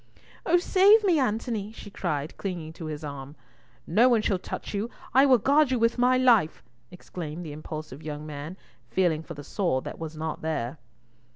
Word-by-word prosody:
"Oh 350 Hz, +1 st, +5 dB
save 395 Hz, +4 st, +5 dB
me, 355 Hz, -6 st, +3 dB
Antony!" 220 Hz, -3 st, -1 dB
she 215 Hz, -2 st, -11 dB
cried 155 Hz, -6 st, -3 dB
clinging 170 Hz, -5 st, -5 dB
to 165 Hz, -, -8 dB
his 155 Hz, -1 st, -5 dB
arm. 140 Hz, -1 st, -7 dB, 0.5 s
"No 230 Hz, +10 st, +4 dB
one 230 Hz, -3 st, +3 dB
shall 195 Hz, -4 st, +1 dB
touch -, -, -6 dB
you. 205 Hz, +3 st, -2 dB, 0.2 s
I 270 Hz, +2 st, +6 dB
will 260 Hz, -2 st, +6 dB
guard 280 Hz, +5 st, +3 dB
you 260 Hz, -, +1 dB
with 230 Hz, +1 st, +1 dB
my 250 Hz, +1 st, +4 dB
life!" 235 Hz, -11 st, +3 dB, 0.3 s
exclaimed 175 Hz, -2 st, -7 dB
the 155 Hz, -, -6 dB
impulsive 155 Hz, -1 st, -7 dB
young 150 Hz, -1 st, -6 dB
man, 155 Hz, +4 st, -7 dB, 0.3 s
feeling 175 Hz, -4 st, +1 dB
for 165 Hz, 0 st, -9 dB
the 145 Hz, -, -8 dB
sword 170 Hz, -7 st, -1 dB
that -, -, -7 dB
was 160 Hz, -1 st, -6 dB
not 160 Hz, 0 st, -4 dB
there. 155 Hz, -3 st, -3 dB
180 Hz, 185 wpm, -27 LUFS, 155-240 Hz, 0.5 s, I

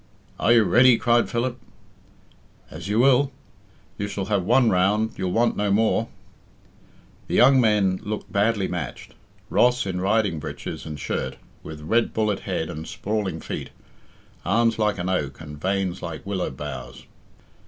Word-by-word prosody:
"Are 115 Hz, -, +3 dB
you 120 Hz, -2 st, +6 dB
ready?" 120 Hz, +6 st, +5 dB
cried 120 Hz, +1 st, +2 dB
Philip. 120 Hz, +1 st, -2 dB, 1.1 s
"As -, -, -8 dB
you 105 Hz, +2 st, 0 dB
will. 135 Hz, +2 st, +4 dB, 0.7 s
You 100 Hz, -, -2 dB
shall 100 Hz, -1 st, -4 dB
have 100 Hz, -2 st, 0 dB
one 120 Hz, +4 st, +4 dB
round, 105 Hz, +5 st, +2 dB
you'll 90 Hz, -1 st, -2 dB
want 115 Hz, +4 st, +2 dB
no 105 Hz, 0 st, 0 dB
more." 110 Hz, +2 st, +2 dB, 1.2 s
The -, -, -2 dB
young 130 Hz, +1 st, +6 dB
men 105 Hz, -5 st, +2 dB
looked 105 Hz, +1 st, -5 dB
badly 105 Hz, -1 st, +1 dB
matched. 85 Hz, -7 st, -6 dB, 0.4 s
Ross, 125 Hz, -1 st, +3 dB
in 90 Hz, -2 st, -3 dB
riding 100 Hz, -4 st, +1 dB
breeches 75 Hz, -, -7 dB
and 75 Hz, -2 st, -6 dB
shirt, -, -, -3 dB, 0.2 s
with 80 Hz, -1 st, -9 dB
red 115 Hz, +9 st, +1 dB
bullet 105 Hz, -3 st, +1 dB
head 90 Hz, -4 st, -3 dB
and 80 Hz, +2 st, -7 dB
sprawling 100 Hz, -6 st, -3 dB
feet, -, -, -5 dB, 0.7 s
arms 115 Hz, +4 st, +2 dB
like 105 Hz, -2 st, +1 dB
an 90 Hz, 0 st, -3 dB
oak 75 Hz, -8 st, -2 dB
and 75 Hz, -2 st, -10 dB
veins 95 Hz, -1 st, -1 dB
like 80 Hz, 0 st, -6 dB
willow 95 Hz, -2 st, -2 dB
boughs. 75 Hz, +2 st, -8 dB
105 Hz, 155 wpm, -24 LUFS, 90-115 Hz, 1.2 s, you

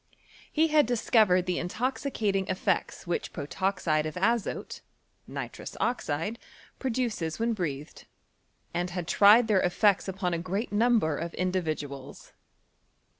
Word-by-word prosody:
He 320 Hz, +1 st, +3 dB
had 300 Hz, -5 st, +4 dB
discovered 215 Hz, -6 st, +3 dB
the 180 Hz, -1 st, -1 dB
intoxicating 210 Hz, -1 st, -1 dB
effect* 185 Hz, 0 st, -1 dB
which 175 Hz, -1 st, -2 dB
protoxide 160 Hz, 0 st, -1 dB
of 155 Hz, -, -6 dB
azote 230 Hz, +4 st, -1 dB, 0.5 s
(nitrous -, -, -7 dB
oxide) 210 Hz, -1 st, -1 dB, 0.4 s
prodoces 230 Hz, -, -2 dB
when 230 Hz, +1 st, +1 dB
breatlicd, 150 Hz, -7 st, -5 dB, 0.7 s
and 175 Hz, +1 st, -1 dB
had 175 Hz, -2 st, -4 dB
tried 215 Hz, +5 st, +6 dB
their 205 Hz, -4 st, +3 dB
effects 195 Hz, +2 st, +2 dB
upon 185 Hz, -2 st, -2 dB
s 165 Hz, -, -1 dB
great 195 Hz, +6 st, -3 dB
number 215 Hz, -7 st, +3 dB
of 170 Hz, +3 st, -5 dB
individuals. 155 Hz, -7 st, -3 dB
190 Hz, 120 wpm, -28 LUFS, 170-225 Hz, 0.7 s, tried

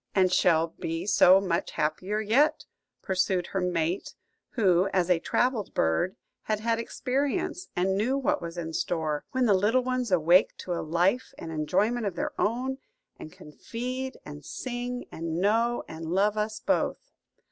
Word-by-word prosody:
"And 185 Hz, -2 st, +3 dB
shall 165 Hz, -3 st, +3 dB
be 165 Hz, 0 st, -3 dB
so 190 Hz, -2 st, +6 dB
much 180 Hz, -3 st, -2 dB
happier 185 Hz, +7 st, -1 dB
yet," 265 Hz, +9 st, +2 dB, 0.4 s
pursued 185 Hz, -1 st, 0 dB
her 190 Hz, -, 0 dB
mate, 175 Hz, 0 st, -1 dB, 0.4 s
who, 190 Hz, -4 st, +3 dB
as 185 Hz, -1 st, +1 dB
a 175 Hz, -, +4 dB
travelled 240 Hz, +1 st, 0 dB
bird, 80 Hz, -, +1 dB, 0.3 s
had 215 Hz, -1 st, -2 dB
had 230 Hz, +1 st, 0 dB
experience, 290 Hz, +10 st, -2 dB
and 190 Hz, +2 st, +1 dB
knew 240 Hz, +7 st, +1 dB
what 275 Hz, -, 0 dB
was 170 Hz, 0 st, -6 dB
in 165 Hz, -1 st, -4 dB
store; 155 Hz, -3 st, -2 dB
"when 260 Hz, -1 st, +1 dB
the 210 Hz, -, +4 dB
little 215 Hz, +7 st, +2 dB
ones 255 Hz, -3 st, -2 dB
awake 175 Hz, +2 st, +4 dB
to 180 Hz, -, -4 dB
a 170 Hz, -, -2 dB
life 175 Hz, +10 st, 0 dB
and 165 Hz, -, -7 dB
enjoyment 200 Hz, +9 st, 0 dB
of 190 Hz, -, -4 dB
their -, -, -2 dB
own, 255 Hz, +5 st, -1 dB, 0.4 s
and 155 Hz, -, -9 dB
can 150 Hz, -, -13 dB
feed 255 Hz, -, -5 dB
and 150 Hz, 0 st, -9 dB
sing, 245 Hz, -, -5 dB
and 165 Hz, 0 st, -4 dB
know 225 Hz, +6 st, +1 dB
and 160 Hz, 0 st, -7 dB
love 200 Hz, +5 st, +2 dB
us 215 Hz, 0 st, -2 dB
both." -, -, -1 dB
195 Hz, 165 wpm, -27 LUFS, 170-240 Hz, 0.4 s, so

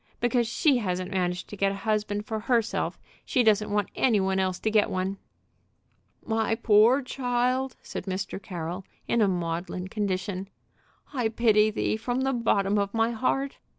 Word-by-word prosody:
"Because 240 Hz, 0 st, +1 dB
she 270 Hz, +3 st, +3 dB
hasn't 185 Hz, -5 st, -2 dB
managed 180 Hz, -2 st, -1 dB
to -, -, -7 dB
get 195 Hz, 0 st, +1 dB
a -, -, -4 dB
husband 210 Hz, -1 st, 0 dB
for 220 Hz, 0 st, -3 dB
herself, 230 Hz, 0 st, 0 dB, 0.3 s
she 250 Hz, -, +2 dB
doesn't 215 Hz, -1 st, +3 dB
want 205 Hz, -2 st, 0 dB
any 230 Hz, -6 st, +3 dB
one 190 Hz, 0 st, +1 dB
else 185 Hz, -1 st, 0 dB
to 220 Hz, -, 0 dB
get 210 Hz, -1 st, +3 dB
one." 185 Hz, +1 st, -2 dB, 1.1 s
"My 225 Hz, -1 st, +1 dB
poor 225 Hz, +5 st, +5 dB
child," 255 Hz, 0 st, -1 dB
said -, -, -6 dB
Mr. 190 Hz, +1 st, -3 dB
Carroll, 175 Hz, 0 st, -5 dB, 0.2 s
in 235 Hz, -, +2 dB
a 210 Hz, -, +5 dB
maudlin 180 Hz, +1 st, -3 dB
condition, 195 Hz, -1 st, -2 dB, 0.6 s
"I 245 Hz, -5 st, 0 dB
pity 220 Hz, -2 st, +4 dB
thee 215 Hz, 0 st, -1 dB
from 245 Hz, +3 st, -2 dB
the 270 Hz, 0 st, +1 dB
bottom 205 Hz, -4 st, +2 dB
of 200 Hz, +2 st, -2 dB
my 225 Hz, +1 st, +2 dB
heart!" 265 Hz, +4 st, -1 dB
210 Hz, 165 wpm, -27 LUFS, 190-235 Hz, 1.1 s, poor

